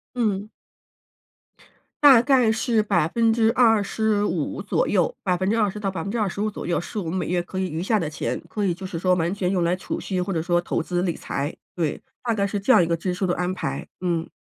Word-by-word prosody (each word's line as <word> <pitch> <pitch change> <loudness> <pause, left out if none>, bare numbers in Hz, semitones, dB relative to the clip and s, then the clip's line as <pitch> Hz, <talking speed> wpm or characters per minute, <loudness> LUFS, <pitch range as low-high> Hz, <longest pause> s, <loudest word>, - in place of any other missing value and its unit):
嗯。 210 -3 0 1.6
大 265 -5 +9
概 250 -3 +4
是 225 -1 +1
25% 220 +2 +2
左 - - 0
右 - - +1
20% 200 +3 0
到 195 -2 -1
25% 205 +1 -2
左 - - -7
右 175 - +1
是 190 +5 -5
我 190 - -2
们 170 - -3
每 175 - -2
月 175 0 +1
可 185 +2 -6
以 190 - 0
余 160 +3 -3
下 215 +2 +2
的 155 -4 -2
钱， - - -3
可 210 - -4
以 175 - +1
就 190 +2 -10
是 170 -3 -5
说 185 +1 +3
完 175 +2 0
全 185 -2 -1
用 180 -3 +1
来 175 +1 +2
储 185 - -4
蓄 185 -2 -2
或 180 - -2
者 165 -3 0
说 175 0 +2
投 175 - -2
资 175 +1 -2
理 175 -3 0
财， 140 +2 -4 0.2
对， 160 -4 -1 0.2
大 235 -2 0
概 200 -1 +1
是 200 0 -3
这 230 - -2
样 175 - +6
一 - - -2
个 170 - +1
支 180 +2 -2
出 190 +1 -1
的 180 - +1
安 180 +1 -1
排。 185 - -4
嗯。 170 -2 -1
190 Hz, 215 characters per minute, -24 LUFS, 175-215 Hz, 1.6 s, 大